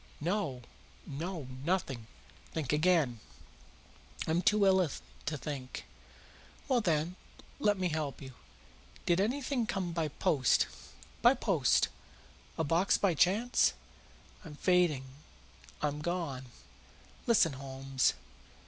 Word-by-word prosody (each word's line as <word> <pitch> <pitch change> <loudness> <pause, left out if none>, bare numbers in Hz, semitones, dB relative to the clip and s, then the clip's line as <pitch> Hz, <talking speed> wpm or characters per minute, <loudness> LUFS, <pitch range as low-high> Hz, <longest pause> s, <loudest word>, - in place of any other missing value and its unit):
"No, 160 - -1 0.4
no; 160 +2 -5 0.2
nothing." 140 -9 -1 0.5
"Think 150 -4 -1
again." 150 -7 +3 1.1
"I'm 165 +2 +1
too 210 +1 +4
ill 190 -3 +4 0.4
to 155 - -1
think." 135 -3 -6 0.8
"Well, 255 -4 +3
then, 170 -1 0 0.5
I'll 205 -1 +4
help 155 -5 -3
you. 130 -1 -9 0.7
Did 175 +2 +3
anything 250 +1 0
come 185 -4 -2
by 165 -2 0
post?" 135 -4 +2 0.6
"By - - +6
post?" - - +2 0.7
"A - - +1
box 165 +5 +3
by 195 -4 +2
chance?" 205 - +3 0.7
"I'm 155 -5 -9
fainting 175 -5 +3 0.8
I'm 150 0 -1
gone!" 160 -6 -2 0.8
"Listen, 195 -10 +4
Holmes!" 135 0 0
165 Hz, 105 wpm, -32 LUFS, 140-190 Hz, 1.1 s, By